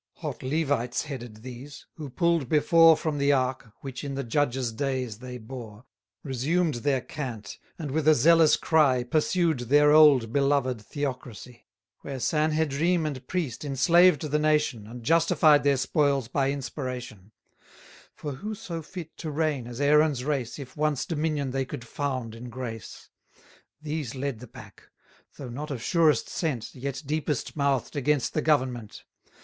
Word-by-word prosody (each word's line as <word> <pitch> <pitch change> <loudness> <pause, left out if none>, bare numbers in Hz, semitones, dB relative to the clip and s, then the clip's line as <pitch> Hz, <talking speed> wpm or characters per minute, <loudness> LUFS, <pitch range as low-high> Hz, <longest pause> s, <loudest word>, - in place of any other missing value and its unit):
Hot - - -6
Levites 135 -4 -1
headed 120 -7 -8
these; 130 +3 -10
who 150 -3 -8
pull'd 165 0 +1
before 165 +1 +6
From 155 -3 -2
the 140 +1 +3
ark, 130 -3 -1
which 135 -1 -7
in 140 -1 -4
the 140 - -3
Judges' 125 -1 0
days 130 -4 -3
they 125 0 -7
bore, 115 -1 -10 0.4
520 145 - -8
Resumed 155 +6 0
their 135 -3 +1
cant, 120 -9 -7 0.2
and 150 -5 -5
with 155 +1 -1
a 155 - +7
zealous 160 +4 +5
cry, 145 -6 +3
Pursued 160 +3 +1
their 145 +5 +4
old 145 -7 +6
beloved 140 -4 +1
theocracy: 125 -2 -6 0.3
Where 135 -2 -6
Sanhedrim 155 +3 +1
and 130 -4 -5
priest 160 -11 -3
enslaved 165 +4 +4
the 150 0 0
nation, 150 -8 +1
And 120 +1 -9
justified 160 0 +4
their 140 -1 +3
spoils 140 -2 +1
by 135 +2 0
inspiration: 125 -6 -6 0.8
For 150 - -5
who 210 +11 -5
so 185 -7 -6
fit 165 0 -9
to 160 - -5
reign 150 -5 -1
as 120 0 -8
Aaron's 145 -2 +3
race, 135 -5 -2
If 140 -4 -9
once 150 -3 0
dominion 150 -4 -1
they 135 +1 -1
could 125 -2 -7
found 130 -3 -3
in 120 +2 -9
grace? 120 -4 -8 0.7
These 150 -4 -4
led 135 -3 -3
the 125 - -10
pack; - - -14 0.6
though 135 -3 -7
not 145 +6 -6
of 130 -6 -5
surest 165 -4 +3
scent, 135 -10 -3
Yet 140 +3 -5
deepest 150 -2 -2
mouth'd 140 -1 0
against 145 -2 0
the 155 - 0
government. 130 -8 -1
140 Hz, 155 wpm, -26 LUFS, 125-155 Hz, 0.8 s, a